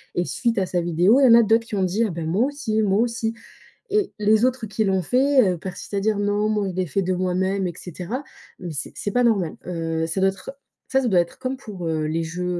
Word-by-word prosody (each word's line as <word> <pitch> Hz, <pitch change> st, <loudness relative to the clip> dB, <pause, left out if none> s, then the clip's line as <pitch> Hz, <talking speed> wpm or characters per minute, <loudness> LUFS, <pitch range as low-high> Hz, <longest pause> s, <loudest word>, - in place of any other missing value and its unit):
et 175 Hz, -, 0 dB
suite 235 Hz, +2 st, -1 dB
à 190 Hz, -, +1 dB
sa 180 Hz, -1 st, -1 dB
vidéo, 175 Hz, -, +3 dB
il 275 Hz, -, +5 dB
y -, -, +7 dB
en 230 Hz, -, +9 dB
a 235 Hz, -, +5 dB
d'autres 225 Hz, +2 st, +3 dB
qui -, -, -4 dB
ont 190 Hz, -, +1 dB
dit: 195 Hz, +6 st, +1 dB
«Ah, -, -, -5 dB
ben, 165 Hz, -1 st, -5 dB
moi 195 Hz, +10 st, +2 dB
aussi!», 250 Hz, -7 st, -1 dB
«Moi 200 Hz, +1 st, +2 dB
aussi!» 230 Hz, -1 st, -2 dB, 0.6 s
et 415 Hz, -1 st, 0 dB
les 215 Hz, +3 st, +4 dB
autres 255 Hz, -2 st, -1 dB
qui 215 Hz, +2 st, -1 dB
l'ont 190 Hz, -1 st, +1 dB
fait, 255 Hz, -, +3 dB
heu, -, -, -5 dB
persistent 190 Hz, +3 st, -7 dB
à -, -, +1 dB
dire: 210 Hz, 0 st, 0 dB
«Non, 205 Hz, +1 st, +1 dB
moi, 210 Hz, -2 st, 0 dB
je -, -, -6 dB
l'ai 185 Hz, 0 st, 0 dB
fait 195 Hz, -, 0 dB
de 185 Hz, 0 st, 0 dB
moi-même» 185 Hz, +1 st, 0 dB
et 175 Hz, -, -5 dB
cetera 185 Hz, -, -6 dB, 0.4 s
mais 180 Hz, -2 st, -6 dB
c'est 140 Hz, -3 st, -5 dB
c'est 205 Hz, -, -3 dB
pas 245 Hz, 0 st, +2 dB
normal, 200 Hz, -9 st, +1 dB
heu, 165 Hz, -2 st, -2 dB
ça 170 Hz, +4 st, -2 dB
doit 195 Hz, -, +4 dB
être 190 Hz, -1 st, -8 dB, 0.4 s
ça 265 Hz, -, +3 dB
ça 250 Hz, -, 0 dB
doit 185 Hz, -5 st, +4 dB
être 170 Hz, -, -2 dB
comme 260 Hz, 0 st, -3 dB
pour, 195 Hz, -9 st, -7 dB
heu, 155 Hz, -1 st, -1 dB
les 165 Hz, +1 st, -1 dB
jeux, 180 Hz, +2 st, -4 dB
195 Hz, 265 wpm, -23 LUFS, 180-230 Hz, 0.6 s, en